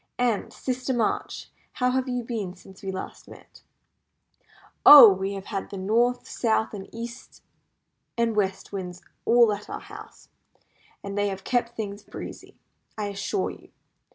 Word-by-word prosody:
"And, 240 -4 0
Sister 255 0 -3
March, 230 -3 -2 0.2
how 250 -2 +1
have 260 0 -1
you 245 -1 -2
been 215 -6 -4
since 190 +1 -16
we 195 - -4
last 190 - -7
met?" - - -15 1.2
"Oh! 250 -9 +11
we 190 +1 -3
have 195 0 -7
had 195 - -3
the 200 - -7
North, 235 +6 +1
South, 220 -2 0 0.2
East, 235 +1 -9 0.7
and 230 -1 +1
West 195 -2 -1
Winds 180 -2 -6 0.2
all 235 -2 +5
at 205 0 -8
our - - -5
house, - - -13 0.7
and 200 0 -5
they 205 0 +1
have 195 -1 -5
kept 240 -1 -1
things 205 -2 -5
breezy, - - -10 0.4
I 210 -1 -2
assure 200 - -2
you. - - -15
215 Hz, 150 wpm, -25 LUFS, 195-240 Hz, 1.2 s, Oh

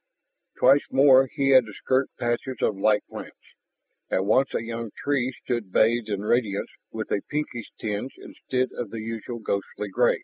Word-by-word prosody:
Twice 135 +3 +6
more 135 -1 +6
he 135 -1 0
had 130 -2 +7
to 110 - -9
skirt 130 +5 0
patches 120 +2 -2
of 105 - +2
light 105 +1 +2
plants, - - -9 0.7
and 95 - +1
once 130 +6 +3
a - - -1
young 115 0 -5
tree 130 -3 +1
stood 120 -6 -3
bathed 115 +2 +3
in 100 -1 -2
radiance 105 -2 0 0.2
with 110 -1 -5
a 100 - +1
pinkish 145 -6 -3
tinge 110 +4 -3
instead 130 0 -3
of 120 -4 -5
the 115 +1 -6
usual 115 +2 -5
ghostly 105 -1 -3
gray. - - +3
115 Hz, 170 wpm, -25 LUFS, 105-130 Hz, 0.7 s, had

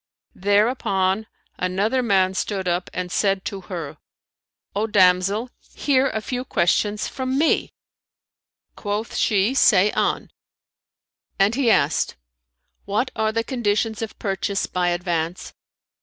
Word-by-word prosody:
Thereupon 200 -1 +1 0.3
another 200 +8 0
man 190 -5 +2
stood 190 -1 -2
up 175 +1 -1
and 180 -1 -4
said 195 -1 +1
to 195 -1 -4
her, 170 -6 -6 0.8
"O 210 +2 0
damsel, 200 +3 +3 0.2
hear 275 -2 +2
a 220 - -3
few 250 +2 -3
questions 205 0 +1
from 260 0 -3
me." 315 +2 +1 1.0
Quoth 210 +2 -4
she, 205 +3 +2
"Say 210 -6 +5
on;' - - -1 1.1
and 195 +3 +3
he 255 -1 +2
asked, 150 -7 +2 0.7
"What 215 +6 -1
are 220 0 +1
the 230 +1 -1
conditions 225 -3 -1
of 225 -1 -5
purchase 195 0 -2
by 180 -1 -1
advance?" 175 -1 -2
205 Hz, 120 wpm, -22 LUFS, 185-225 Hz, 1.1 s, Say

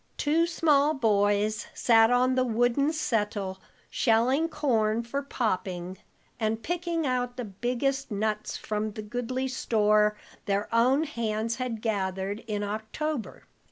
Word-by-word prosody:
Two 320 +3 +2
small 305 -3 +3
boys 210 -3 +1
sat 225 -2 +5
on 250 +1 +3
the 255 0 +2
wooden 245 +5 +2
settle 210 -9 -1 0.3
shelling 255 +7 +2
corn 225 -7 +1
for 275 +4 -3
popping, 185 -8 -3 0.4
and 220 0 -1
picking 340 0 -2
out 250 -1 -1
the 245 - -3
biggest 250 +7 -2
nuts 215 0 -2
from 215 0 -3
the 215 - -6
goodly 245 +4 -3
store 210 -4 +2 0.3
their 200 +1 0
own 255 +6 +4
hands 230 -5 -2
had 245 -4 -4
gathered 195 -2 -1
in 205 -2 -2
October. 220 +6 -4
230 Hz, 125 wpm, -27 LUFS, 210-260 Hz, 0.4 s, sat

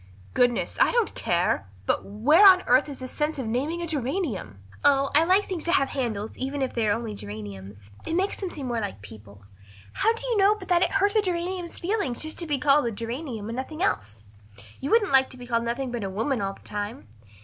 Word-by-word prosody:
"Goodness, 245 -1 +1
I - - +6
don't 475 -3 +1
care. 170 - 0 0.2
But - - 0
where 250 - +4
on 375 -2 +8
earth 255 +5 +4
is 280 - -7
the 255 - -7
sense 300 +3 -2
of 265 - -3
naming 285 +10 -2
a - - -1
geranium?" 270 - -3 0.3
"Oh, 275 -1 +4
I 310 - +6
like 375 +4 +3
things 360 -4 -4
to 340 - +1
have 275 -7 +3
handles 220 -5 -3
even 270 +1 -2
if 260 - -3
they 230 -2 0
are - - +3
only 230 -1 -4
geraniums. 100 - -8 0.3
It 325 - -1
makes 385 +3 0
them 385 - -4
seem 290 -5 -7
more 240 -2 -1
like 195 - -5
people. 105 -1 -13 0.5
How 450 - +2
do 460 +2 -5
you 480 -3 0
know 400 +1 +5
but 380 -3 -11
that 350 -1 +4
it - - +3
hurts 400 +2 +2
a - - +5
geranium's 355 -1 -3
feelings 350 - -1
just 315 0 -5
to 340 - -2
be 290 -2 0
called 280 0 +3
a - - -1
geranium 230 0 -5
and 230 - -4
nothing 310 +6 -4
else? 105 0 -2 0.5
You 275 - -4
wouldn't 445 -4 +3
like 265 -1 +5
to 255 - -10
be 245 - -9
called 235 -1 0
nothing 245 +2 -2
but 240 -3 -3
a 195 - -3
woman 225 +5 -1
all 195 0 -2
the - - -18
time. 205 - -6
265 Hz, 235 wpm, -26 LUFS, 215-340 Hz, 0.5 s, on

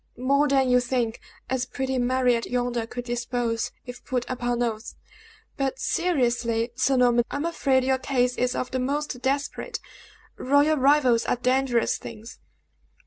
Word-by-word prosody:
"More 280 +4 +2
than 270 -2 +3
you 250 0 +5
think, 245 -2 -1 0.3
as 255 -1 -1
pretty 265 +1 -2
Mariette 245 -1 +1
yonder 245 -2 -1
could 245 +1 -6
depose, 240 -1 -2
if 245 0 -9
put 250 -3 -2
upon 245 -1 -1
oath. 225 -1 -4 0.6
But 270 -1 -1
seriously, 240 -8 0
Sir 260 +1 +2
Norman, 245 -1 +4
I - - -5
am 285 +3 -2
afraid 275 -6 +1
your 260 0 +1
case 250 -2 0
is 250 0 0
of 255 - -3
the 260 - -1
most 275 0 -2
desperate; 275 +2 -2 0.6
royal 285 +4 +3
rivals 265 -4 +4
are - - +1
dangerous 250 -1 +1
things!" 225 +1 -10
250 Hz, 150 wpm, -25 LUFS, 240-270 Hz, 0.6 s, you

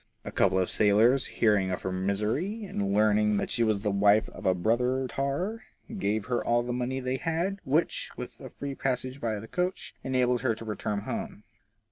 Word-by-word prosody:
A - - -5
couple - - +2
of 95 -1 +2
sailors 110 +6 +4
hearing 105 -4 +2
of 90 - -3
her 95 - -2
misery, 105 - -1
and 100 - -2
learning 105 0 +3
that - - -2
she - - +1
was 110 -3 +1
the 105 - +1
wife 100 +2 +4
of - - -6
a 95 - +4
brother 125 +7 +1
tar, 145 - -2 0.3
gave 110 - -1
her 125 -1 -1
all 120 0 +2
the 120 0 -3
money 125 +2 -2
they 130 0 -2
had, 170 +7 -1
which, 150 +5 +1
with - - -7
a - - -8
free 140 0 -6
passage 130 0 -2
by 110 -2 -1
the 110 - -9
coach, 180 +7 -2
enabled 125 -2 +1
her 120 -4 +1
to 115 - -9
reach 105 -1 -5
home. 105 0 -3
120 Hz, 195 wpm, -28 LUFS, 105-135 Hz, 0.3 s, sailors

